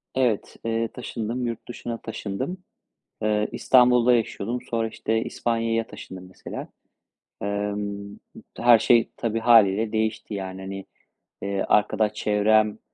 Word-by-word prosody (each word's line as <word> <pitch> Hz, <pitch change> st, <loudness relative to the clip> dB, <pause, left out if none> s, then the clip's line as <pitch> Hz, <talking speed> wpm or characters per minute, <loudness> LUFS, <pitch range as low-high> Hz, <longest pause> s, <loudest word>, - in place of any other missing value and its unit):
Evet, 125 Hz, -6 st, 0 dB
eee, 115 Hz, 0 st, 0 dB
taşındım, 120 Hz, 0 st, -4 dB
yurt 115 Hz, -1 st, -6 dB
dışına 120 Hz, -1 st, -5 dB
taşındım. 110 Hz, -, -4 dB, 0.7 s
Eee, 105 Hz, 0 st, +1 dB
İstanbul'da 125 Hz, -1 st, +5 dB
yaşıyordum 115 Hz, +1 st, -1 dB
sonra 115 Hz, -1 st, 0 dB
işte, 110 Hz, +1 st, -1 dB
İspanya'ya 115 Hz, -1 st, -1 dB
taşındım, 90 Hz, -1 st, -10 dB
mesela. -, -, -8 dB, 0.7 s
Emm, 100 Hz, 0 st, -3 dB, 0.4 s
her 120 Hz, -2 st, +6 dB
şey 120 Hz, -2 st, +4 dB
tabii 115 Hz, -1 st, -1 dB
hâliyle 110 Hz, -2 st, +5 dB
değişti, 110 Hz, 0 st, -2 dB
yani, 95 Hz, -1 st, -5 dB
hani, 95 Hz, 0 st, -6 dB, 0.6 s
eee, 100 Hz, 0 st, -1 dB
arkadaş 105 Hz, 0 st, +2 dB
çevrem 105 Hz, 0 st, +2 dB
110 Hz, 115 wpm, -25 LUFS, 100-115 Hz, 0.7 s, her